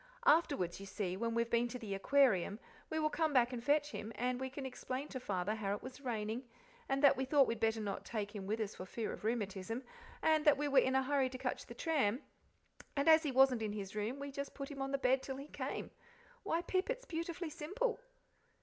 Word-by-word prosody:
Afterwards, 285 - +3
you 195 - -8
see, 190 -2 -2
when 230 +3 -1
we've 235 0 0
been 235 +1 +3
to 250 - -5
the 220 -5 -5
Aquarium, 205 -2 +3 0.3
we 315 - -2
will 305 -1 +1
come 320 -3 +1
back 250 -1 +4
and 235 -2 -4
fetch 295 +2 +2
him, 215 -3 -5
and 250 +1 -1
we 265 - -2
can 270 +1 -6
explain 265 +1 -4
to 260 - -4
Father 200 -3 -1
how 205 -2 -1
it - - -10
was 260 +2 -8
raining, 225 -1 -2 0.5
and 275 +1 +1
that 280 - +8
we 265 - -1
thought 275 +1 +5
we'd 230 -2 -2
better 225 0 +2
not 200 -2 -3
take 205 -2 -4
him 195 -2 -5
with 215 +2 -1
us 210 -1 -2
for 185 - -8
fear 225 +3 -3
of - - -9
rheumatism, 215 +1 -2 0.4
and 315 -1 +4
that 295 -3 +6
we 295 +1 0
were 280 -1 +6
in 260 0 +2
a 265 - +4
hurry 270 -1 +2
to 255 - -6
catch - - -3
the - - -9
tram, 275 -6 +1 0.7
and 280 +1 +1
as 320 0 +8
he 300 -4 -1
wasn't 260 -2 +5
in 215 -1 -2
his 200 -1 -5
room 215 +5 -2
we 280 0 -5
just 280 +1 -5
put 275 +1 -5
him 275 -1 -6
on 270 - -1
the 275 - +1
bed 260 0 +3
till 265 0 -5
he 275 - -7
came. - - -4 0.5
Why, 345 -4 0
Pip, 370 +3 0
it's - - -2
beautifully 335 -1 -4
simple!" 405 +12 -2
260 Hz, 240 wpm, -36 LUFS, 220-285 Hz, 0.7 s, that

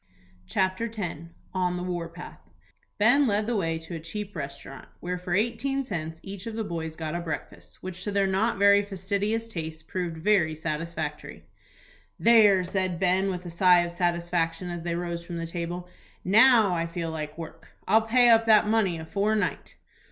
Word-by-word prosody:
CHAPTER 190 - 0
X. 170 -4 -5 0.2
ON 180 -1 0
THE 180 - -4
WAR 175 -2 -3
PATH. 175 +2 -10 0.6
Ben 250 +7 +5
led 210 0 +1
the 235 +1 -1
way 165 -5 0
to 165 +2 -9
a 165 - -4
cheap 200 +6 -6
restaurant, 140 -2 -7
where 180 +1 -4
for 180 -1 -2
eighteen 240 +6 0
cents 160 -8 -5
each 195 +1 -8
of 225 - -5
the 225 - -2
boys 165 -5 -5
got 155 -1 -4
a 175 - -2
breakfast, 165 -2 -7
which 185 0 -6
to 205 - -3
their 200 -1 +2
not 195 +4 +1
very 200 0 +6
fastidious 205 +3 -2
tastes 160 -6 -6
proved 175 -2 -4
very 160 -3 +2
satisfactory. 165 +2 -5 0.7
"There," 210 -5 +6
said 185 -1 -1
Ben, 190 +1 +2
with 180 -1 -4
a 175 - -6
sigh 180 +1 +5
of 170 0 -3
satisfaction, 175 0 -1
as 175 -1 -5
they 170 0 -2
rose 170 -1 -4
from 170 0 -6
the 165 - -3
table, 175 +1 -5 0.4
"now 220 0 +6
I 165 -1 -1
feel 165 -1 -4
like 155 -1 -5
work; 165 -1 -10
I'll 220 - +5
pay 240 +2 +4
up 225 0 +5
that 215 -1 +6
money 210 -5 +1
afore 200 +7 -1
night." 210 - -2
180 Hz, 180 wpm, -27 LUFS, 170-205 Hz, 0.7 s, very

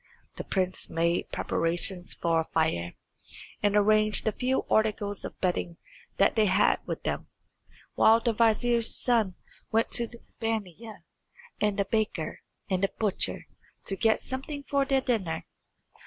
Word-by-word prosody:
The - - -4
prince 185 -1 -2
made 170 +1 0
preparations 175 +2 -1
for 165 -1 +1
a 160 - -1
fire, 125 - 0 0.7
and 205 0 +2
arranged 215 +1 +4
the 220 - +2
few 255 +4 -1
articles 210 -2 +1
of - - -7
bedding 175 -2 -1 0.4
that 195 - +3
they 215 -2 +4
had 190 - +3
with - - -4
them, - - -3 0.7
while 225 +1 +5
the 230 0 0
vizier's 230 +1 +3
son 225 -7 +1 0.4
went 225 +1 +1
to 235 - +2
the 235 0 -14 0.2
baniya 220 -1 -4 0.6
and 210 -1 +1
the 200 - +1
baker 210 -6 -2 0.3
and 185 -2 0
the 195 - +1
butcher 210 -4 -2 0.4
to 195 - -1
get 220 +2 +2
something 280 +2 -5
for 280 -1 +1
their 270 -1 +2
dinner. 190 -11 -1
210 Hz, 145 wpm, -28 LUFS, 185-230 Hz, 0.7 s, while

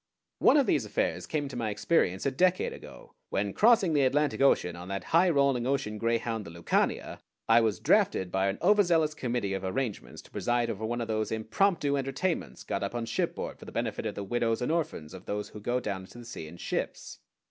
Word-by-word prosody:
One - - +6
of 280 - +4
these - - +2
affairs - - -1
came 155 -2 -1
into 140 - -6
my 115 -3 -1
experience 100 - +1
a 140 - +2
decade 180 +6 +2
ago, - - -12 0.2
when, 100 0 -1
crossing 215 -6 +4
the 145 - +3
Atlantic 140 +2 +1
Ocean 90 -10 +3
on 90 +1 -9
that 100 0 -4
high 175 +3 +6
rolling 140 -5 +2
ocean 130 -6 -1
greyhound, 115 -1 -1
the 85 - -9
Lucania, 85 +1 -1 0.3
I 115 +1 +6
was 110 -3 0
drafted 95 -2 +2
by 95 +1 +1
an 100 - -1
overzealous 175 -6 +4
committee 120 -8 -2
of 95 -1 -3
arrangements 110 +3 -3
to - - -19
preside 120 -1 0
over 105 +1 -6
one 120 +1 -2
of 115 - -3
those 110 -1 -1
impromptu 140 - +1
entertainments 135 +7 -2
got - - -3
up - - -3
on 120 -1 -2
shipboard 115 - -3
for - - -11
the - - -9
benefit - - -2
of - - -5
the 100 - -4
widows 115 +2 0
and 125 +4 -1
orphans 150 - -2
of 95 - -10
those 105 0 -3
who 105 - -10
go 120 +4 0
down 100 -5 -3
into 95 +5 -13
the 120 - -10
sea 115 -9 -7
in 85 +3 -11
ships. - - -4
120 Hz, 215 wpm, -29 LUFS, 105-145 Hz, 0.3 s, One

